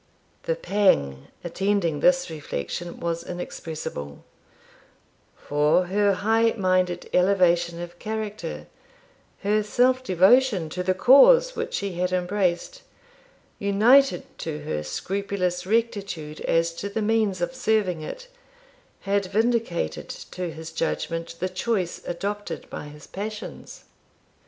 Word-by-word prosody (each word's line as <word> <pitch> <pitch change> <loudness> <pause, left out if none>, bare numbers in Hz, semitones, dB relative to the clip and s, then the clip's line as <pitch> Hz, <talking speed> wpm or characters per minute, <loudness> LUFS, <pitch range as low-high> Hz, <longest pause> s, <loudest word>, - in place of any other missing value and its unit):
The - - +3
pang 130 - +1 0.2
attending 175 -3 0
this 265 - +3
reflection 160 - -5
was 170 0 -2
inexpressible; 155 - -6 1.1
for 150 +5 +2
her 200 +2 +2
high 225 +4 +2
minded 185 -2 +1
elevation 175 -2 +3
of 175 0 -8
character, 210 - -5 0.8
her 210 +2 +2
self 255 +4 +2
devotion 190 -2 +4
to 180 - -3
the 185 +1 +1
cause 485 - +6
which 470 +1 -3
she 200 -2 -2
had 180 0 0
embraced, 185 - -1 0.8
united 215 +2 +4
to 155 -2 -4
her 75 - -2
scrupulous 180 - -2
rectitude 200 -9 -2
as 165 0 +2
to 200 - -4
the 215 +2 -2
means 215 -3 +1
of 175 +7 -2
serving 215 -9 0
it, - - -7 0.7
had 200 -1 0
vindicated 220 - -1
to 180 -1 -6
his 160 +1 -8
judgment 165 +1 -3
the 185 - 0
choice 185 -1 -2
adopted 205 +4 -4
by - - -6
his 150 0 -12
passions. 210 +2 -7
185 Hz, 115 wpm, -25 LUFS, 170-215 Hz, 1.1 s, cause